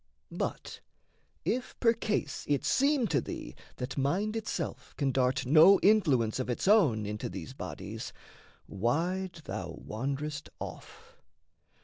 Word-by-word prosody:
But, - - -4 0.7
if 250 +1 -2
percase 230 -2 +1
it 145 -1 +1
seem 275 -2 +3
to 140 -5 +2
thee - - -6 0.2
that 130 +3 -4
mind 190 +11 0
Itself 215 -6 -4
can 140 -2 +1
dart 130 0 +1
no 160 +9 +7
influence 145 - +3
of 130 - -2
its 120 - -1
own 155 - +5
Into 105 +1 -4
these - - -7
bodies, - - -6 0.6
wide 170 - -1
thou 85 -3 -5
wand'rest 140 +6 -3
off. 460 +2 -9
150 Hz, 120 wpm, -30 LUFS, 125-210 Hz, 0.7 s, no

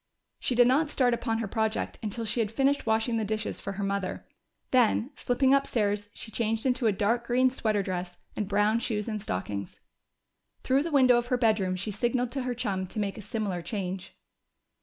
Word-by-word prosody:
She 250 - 0
did 245 0 +6
not 290 +5 +3
start 250 -4 +2
upon 230 -1 -1
her 225 -2 -2
project 220 +2 -1
until 225 +2 -3
she 220 +3 -2
had 215 -2 0
finished 275 +2 +1
washing 225 +1 +2
the 220 - 0
dishes 215 +1 -3
for - - -4
her 200 +1 -4
mother. 195 -1 -2 0.5
Then, 250 +1 +3
slipping 260 +2 +2
upstairs, 205 -7 +1
she 220 - -8
changed 225 +1 -1
into 250 -2 +2
a - - +4
dark 225 +4 0
green 255 +1 +3
sweater 215 -5 0
dress 180 -1 -4 0.2
and 210 - -2
brown 210 +2 +2
shoes 220 -3 -2
and 215 -2 -3
stockings. 100 - -4 0.8
Through 265 +2 +3
the 330 - -2
window 255 -4 +6
of 240 - -5
her 250 - +1
bedroom 215 -6 +2
she 195 +4 -3
signaled 240 +3 0
to 270 - -2
her 250 -1 -2
chum 195 -6 -2
to 215 - -5
make 200 0 -2
a - - -6
similar 200 -3 -3
change. 190 0 -4
220 Hz, 200 wpm, -28 LUFS, 200-245 Hz, 0.8 s, did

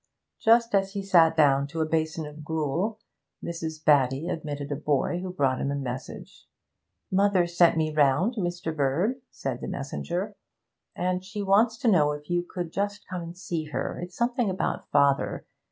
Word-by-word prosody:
Just 230 0 +4
as 195 -1 +2
he 200 -1 -3
sat 165 -4 +4
down 140 -2 +4
to 165 +3 -6
a 160 - +2
basin 160 0 -1
of 150 +1 -10
gruel, 160 +7 -1 0.5
Mrs. 160 -2 -5
Batty 140 +1 +3
admitted 145 -2 -4
a - - 0
boy 150 +4 0
who 185 0 -5
brought 135 -6 0
him 140 - -1
a 140 - -1
message. 130 -2 -7 0.6
'Mother 195 -1 +3
sent 170 -1 +4
me 155 -1 0
round, 150 - +3
Mr. 175 -6 -3
Bird,' 165 - 0
said 130 -3 -5
the - - -5
messenger, 175 +8 -4 0.6
'and 180 +1 -1
she 205 +2 -5
wants 220 +4 +3
to 245 - -2
know 150 -8 +4
if 150 +2 -8
you 175 0 +2
could 175 -1 -6
just 205 +1 -3
come 180 -1 -4
and 170 +1 -8
see 170 -4 -3
her; 150 - -4
it's 180 +1 -8
something 240 -2 +1
about 185 - -2
father. 140 -1 +2
165 Hz, 175 wpm, -27 LUFS, 145-195 Hz, 0.6 s, Just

